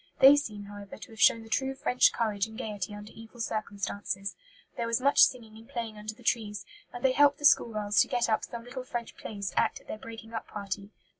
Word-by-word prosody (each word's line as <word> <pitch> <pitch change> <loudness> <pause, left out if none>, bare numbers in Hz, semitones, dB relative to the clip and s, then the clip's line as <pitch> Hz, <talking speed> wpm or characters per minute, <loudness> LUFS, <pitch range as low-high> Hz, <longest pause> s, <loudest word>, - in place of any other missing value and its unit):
They 275 +1 +10
seem, 210 -8 -3
however, 205 -1 -9
to - - -11
have 225 - -8
shown 230 - +6
the - - -13
true 265 +4 0
French 250 -1 +4
courage 215 -3 0
and 220 0 -11
gaiety 210 -3 -4
under 205 +1 -10
evil 225 +2 -13
circumstances. 200 -3 -3 0.4
There 230 - -2
was 230 +1 +1
much 280 +2 +4
singing 225 -4 -6
and 225 +1 -14
playing 230 -2 -4
under 210 +1 -6
the - - -18
trees; 210 -3 -1 0.3
and 245 +1 -5
they 265 - +5
helped 285 +2 +5
the 295 - -3
school 290 -6 +6
girls 205 -2 +2
to - - +2
get 240 -1 +1
up 220 -1 +1
some 235 -1 -6
little 255 +2 -7
French 240 -2 -5
plays 200 -3 -5
to - - +1
act - - +1
at - - -23
their 215 - -6
breaking 225 0 -10
up 225 - -4
party. 200 0 -5
225 Hz, 235 wpm, -29 LUFS, 210-245 Hz, 0.4 s, They